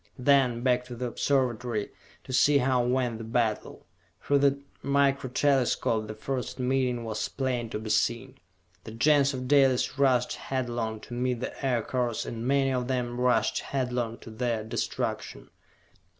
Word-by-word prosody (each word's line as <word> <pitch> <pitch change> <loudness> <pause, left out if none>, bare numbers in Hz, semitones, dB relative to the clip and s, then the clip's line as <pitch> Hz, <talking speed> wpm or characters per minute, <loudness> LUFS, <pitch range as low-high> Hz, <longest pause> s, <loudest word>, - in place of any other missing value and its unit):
Then, 125 -3 +3
back 125 -1 +2
to 125 - -8
the 125 +2 -4
Observatory, 120 -4 -1 0.3
to 130 - -8
see 140 +3 +5
how 125 -2 +2
went 125 -2 0
the - - -6
battle. 115 -1 -2 0.4
Through 140 0 +3
the 140 0 +3 0.2
Micro 140 -1 +1
Telescopes 125 -5 +1
the 110 - -6
first 125 +3 -4
meeting 125 -2 0
was 110 -1 -3
plain 125 -3 -2
to - - -3
be 110 0 -4
seen. 130 +5 0 0.4
The 110 - -9
Gens 140 +3 +3
of 130 0 -5
Dalis 135 -1 +3
rushed 130 -3 +3
headlong 120 -4 -3
to - - -10
meet 125 0 -1
the 130 - -6
Aircars 125 -2 -1
and 115 +1 -5
many 135 0 +2
of 125 -1 -1
them 125 -2 -2
rushed 125 0 +2
headlong 125 -4 -2
to 115 - -10
their 115 -1 -2
destruction. 110 - -4
125 Hz, 155 wpm, -28 LUFS, 115-135 Hz, 0.4 s, see